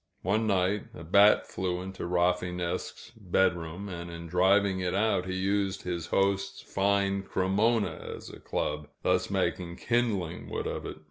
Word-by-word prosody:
One 110 +4 +1
night, 95 0 +1
a 80 - -9
bat 100 +6 +5
flew 90 -1 -2
into 95 -2 -6
Rafinesque's 90 +3 -1
bedroom, 90 -2 0
and 85 -2 -6
in 85 0 -7
driving 95 +3 +3
it 90 0 -1
out 100 -3 +1
he 95 - -2
used 95 +1 0
his 85 -2 -3
host's 100 +1 +1
fine 100 0 +1
Cremona 100 +4 0
as - - -10
a - - -11
club, 75 0 -3 0.2
thus - - +2
making 85 -1 -1
kindling 110 -9 -1
wood - - -3
of - - -3
it. - - -7
95 Hz, 150 wpm, -29 LUFS, 90-100 Hz, 0.2 s, bat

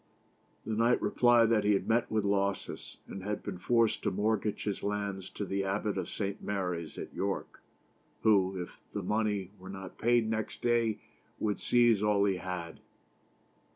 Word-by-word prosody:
The 110 - -2
knight 115 +3 +3
replied 120 -2 +4
that 110 -2 +3
he 105 - +4
had 100 - 0
met 115 +1 +2
with 110 -2 0
losses, 100 -1 -1
and 95 - -7
had 105 +2 -3
been 95 -4 -5
forced 115 +1 +2
to - - +1
mortgage 105 +1 0
his 105 -2 -2
lands 100 -2 -3
to 100 - -5
the 95 +1 -1
Abbot 100 +2 -1
of 95 -3 -3
St. 100 -1 -3
Mary's 90 -5 -3
at - - -7
York, 100 0 -3 0.6
who, 95 -3 +4
if 90 - -7
the 100 - -3
money 105 -1 0
were 95 +1 -10
not 95 -1 -8
paid 120 -1 +3
next 110 -1 -3
day, 115 -2 +2 0.4
would 105 -2 -1
seize 120 -4 +4
all 105 -1 +3
he 95 -2 +1
had. 90 -3 -5
100 Hz, 170 wpm, -31 LUFS, 95-110 Hz, 0.6 s, replied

